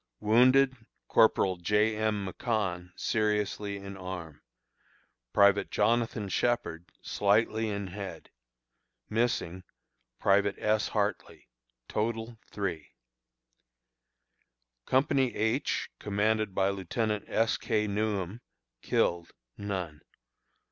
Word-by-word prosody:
Wounded: 130 +4 +5 0.3
Corporal 95 -4 +4
J. 105 +5 +2
M. 105 -2 0
McConn, 95 -4 -2
seriously 105 -1 -1
in 100 0 -8
arm; 90 -5 -7 0.9
Private 100 +3 +4
Jonathan 115 -2 +1
Shepherd, 95 -6 -1
slightly 110 +2 +1
in 100 -1 -3
head. 95 +1 -8 0.8
Missing: 105 -6 0 0.5
Private 100 0 +3
S. 110 0 +1
Hartley. 105 -2 -3 0.4
Total, 115 +1 -3
3. 90 -7 -4 2.0
Company 130 -1 +2
H, 110 +6 0
commanded 105 0 0
by 95 0 +3
Lieutenant 105 +3 -2
S. 115 0 +1
K. 105 -2 0
Newham. 105 0 -2 0.4
Killed: 85 -1 0 0.3
None. 95 -7 -4
105 Hz, 85 wpm, -29 LUFS, 95-110 Hz, 2.0 s, Wounded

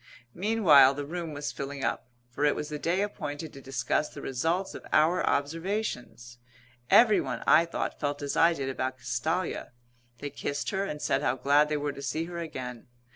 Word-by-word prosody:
Meanwhile 170 -10 +5
the 145 0 -4
room 170 +1 -5
was 145 0 -4
filling 140 0 -6
up, - - -2 0.2
for 130 - -3
it 145 - +4
was 150 - -4
the 150 -1 -5
day 175 +5 0
appointed 155 -6 -5
to 135 - -11
discuss 135 +3 -1
the - - -10
results 165 +9 -1
of - - -9
our 165 +4 +4
observations. 145 - -2 0.5
Everyone, 220 -3 +4
I 165 - +6
thought, 170 - -4
felt 145 0 -2
as 140 - -2
I 170 +1 +5
did 140 -4 -4
about 130 -1 -2
Castalia. 130 +6 -2 0.4
They 145 +4 -6
kissed 145 0 -3
her 195 0 -1
and 150 -6 -5
said 135 - +1
how 125 -3 +1
glad 145 +3 +3
they 150 - 0
were 145 -1 -2
to 140 - -9
see 155 +4 -2
her 170 0 -6
again. 125 -7 -6
145 Hz, 185 wpm, -28 LUFS, 135-170 Hz, 0.5 s, I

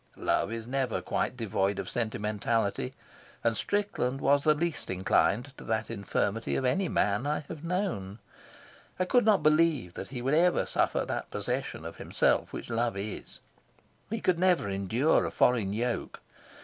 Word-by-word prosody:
Love - - 0
is 115 -1 -4
never 130 -1 -1
quite 125 - -2
devoid 100 -3 0
of - - -4
sentimentality, 110 - -1 0.5
and 115 -1 +2
Strickland 200 - -1
was 140 +1 +3
the 155 -1 +4
least 165 +1 -2
inclined 100 +7 +1
to - - -10
that 110 0 -2
infirmity 105 +1 -1
of 130 - 0
any 185 +7 +1
man 105 +6 +1
I 150 +1 0
have 155 +1 -9
known. 170 - -2 0.8
I 185 - +2
could 245 +4 +3
not 215 -3 +4
believe 155 - +3
that 95 - -6
he 125 -3 -6
would 135 +3 +1
ever 175 +3 +4
suffer - - +1
that - - -4
possession - - -3
of - - -7
himself - - +1
which - - -6
love 115 -2 0
is; 100 +1 -6 0.7
he 225 0 -3
could 180 -2 +2
never 180 - +3
endure 100 +9 +2
a - - -1
foreign 115 -6 +2
yoke. 120 +3 -2
125 Hz, 160 wpm, -29 LUFS, 105-155 Hz, 0.8 s, the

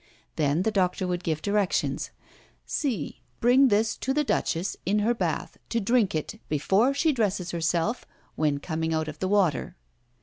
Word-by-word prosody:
Then 150 +3 +1
the 220 - +1
doctor 185 -2 +1
would 180 0 -2
give 155 -3 -2
directions: 170 -8 0 0.6
"See! 270 -8 -2 0.2
Bring 255 +3 +5
this 215 -1 +2
to 265 +1 -2
the 300 - +3
Duchess 180 - -1
in 200 +3 +1
her 215 +3 +2
bath, 235 - -3
to 235 - 0
drink 225 -3 +2
it, 185 +8 -4
before 195 - +2
she 315 +2 +3
dresses 205 - -1
herself, 170 +7 -1 0.3
when 150 -2 +1
coming 160 +1 -2
out 160 0 -1
of 155 0 -7
the 185 - -1
water." 190 -7 +1
190 Hz, 165 wpm, -26 LUFS, 160-225 Hz, 0.6 s, Bring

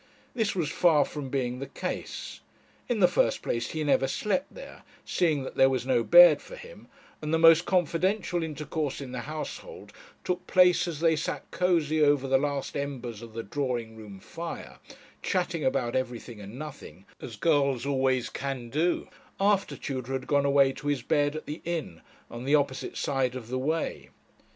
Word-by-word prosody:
This 220 -5 0
was 165 -5 -1
far 160 -5 +4
from 145 -3 -6
being 125 -2 -2
the 135 - -5
case. - - -5 0.5
In 230 -4 0
the 180 - +8
first 115 -10 +1
place 120 0 -2
he 155 -1 -3
never 140 -2 +2
slept 210 - -1
there, - - -11 0.2
seeing 155 -6 +1
that - - -6
there 135 - +6
was 130 -2 -1
no 125 -3 +2
bed 175 +2 +8
for - - -11
him; - - -13 0.3
and 150 0 -3
the 160 - +3
most 165 +1 +6
confidential 180 +1 +1
intercourse 155 -2 -3
in 135 -3 -7
the 125 - -4
household 155 - -7 0.3
took 180 0 -3
place 180 -1 +4
as 160 -3 -5
they 165 -1 +4
sat 150 - -3
cosy 165 -4 +1
over 145 -2 +3
the 135 0 +3
last 140 -1 -2
embers 130 -6 -4
of 115 -2 -11
the 115 - -4
drawing 120 -1 -3
room 105 -3 -11
fire, 165 - -8 0.4
chatting 175 -4 -1
about 130 -3 0
everything 120 -3 -4
and 105 +4 -9
nothing, 100 - -9 0.2
as 115 - -7
girls 140 -2 +1
always 130 -3 +1
can 130 -3 -4
do, 165 +5 0 0.3
after 200 0 +2
Tudor 130 -2 -4
had 130 -1 -3
gone 140 -1 +2
away 140 -1 +4
to 145 - -8
his 145 -4 0
bed 145 +2 +1
at 155 - -6
the 150 +2 -6
inn, 165 - -4 0.3
on 120 +2 -8
the 145 +2 +4
opposite 140 -2 -1
side 130 -3 0
of 120 -3 -7
the 130 +1 -2
way. 155 +5 -2
145 Hz, 180 wpm, -28 LUFS, 130-165 Hz, 0.5 s, the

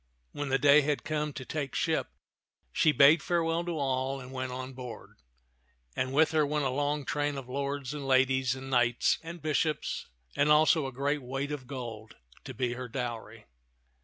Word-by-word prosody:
When 145 -1 -4
the 135 - +3
day 145 +1 +6
had 145 0 -1
come 150 -1 -2
to 130 0 -7
take 145 -2 -4
ship, - - 0 0.6
she 155 - +4
bade 150 +2 +6
farewell 170 0 0
to 170 -2 -3
all 135 -1 -1
and 130 0 -10
went 130 -1 -3
on 130 +1 -6
board; 125 - -9 0.8
and 130 0 -1
with 155 +3 +4
her 155 -1 +3
went 150 0 0
a 130 - +1
long 145 +1 -1
train 145 -1 -1
of 135 -2 -7
lords 140 0 -3
and 145 -2 -5
ladies 130 -1 +3
and 135 0 -8
knights 120 -1 +2
and 165 -1 -9
bishops 155 0 -1 0.3
and 145 +1 +2
also 155 -1 +5
a - - -6
great 140 +3 -1
weight 135 +3 -4
of 135 -4 -5
gold 115 -5 -7 0.3
to - - -6
be 125 -2 -1
her 125 0 -6
dowry. 120 -2 -5
135 Hz, 185 wpm, -29 LUFS, 130-150 Hz, 0.8 s, day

